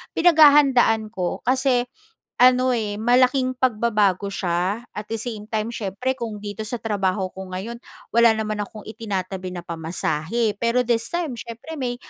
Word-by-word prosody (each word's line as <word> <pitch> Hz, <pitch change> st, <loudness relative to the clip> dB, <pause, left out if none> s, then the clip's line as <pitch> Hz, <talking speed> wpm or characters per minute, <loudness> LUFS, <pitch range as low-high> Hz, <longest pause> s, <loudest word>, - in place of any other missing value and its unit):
pinaghahandaan 280 Hz, -9 st, +5 dB
ko 180 Hz, -5 st, -3 dB
kasi, 255 Hz, 0 st, +2 dB, 0.5 s
ano, 255 Hz, 0 st, +4 dB
eh, 210 Hz, -2 st, -3 dB
malaking 255 Hz, +2 st, +3 dB
pagbabago 215 Hz, -6 st, +1 dB
siya, 190 Hz, +3 st, -1 dB
at 210 Hz, 0 st, -7 dB
the 225 Hz, -, -3 dB
same 220 Hz, -2 st, -6 dB
time 220 Hz, 0 st, -2 dB
siyempre, 235 Hz, +5 st, -3 dB
kung 225 Hz, -2 st, -4 dB
dito 210 Hz, +1 st, -5 dB
sa 245 Hz, -, -3 dB
trabaho 195 Hz, -4 st, -1 dB
ko 190 Hz, 0 st, -8 dB
ngayon, 195 Hz, +6 st, -6 dB, 0.3 s
wala 235 Hz, -1 st, +5 dB
naman 215 Hz, -1 st, -3 dB
akong 210 Hz, 0 st, -6 dB
itinatabi 190 Hz, -4 st, -5 dB
na 175 Hz, -, -6 dB
pamasahe. 170 Hz, +5 st, -2 dB
Pero 235 Hz, +2 st, +2 dB
this 230 Hz, -1 st, 0 dB
time, 345 Hz, -4 st, -2 dB
siyempre 235 Hz, +8 st, -8 dB
may, 245 Hz, -2 st, -2 dB
225 Hz, 150 wpm, -22 LUFS, 200-245 Hz, 0.5 s, pinaghahandaan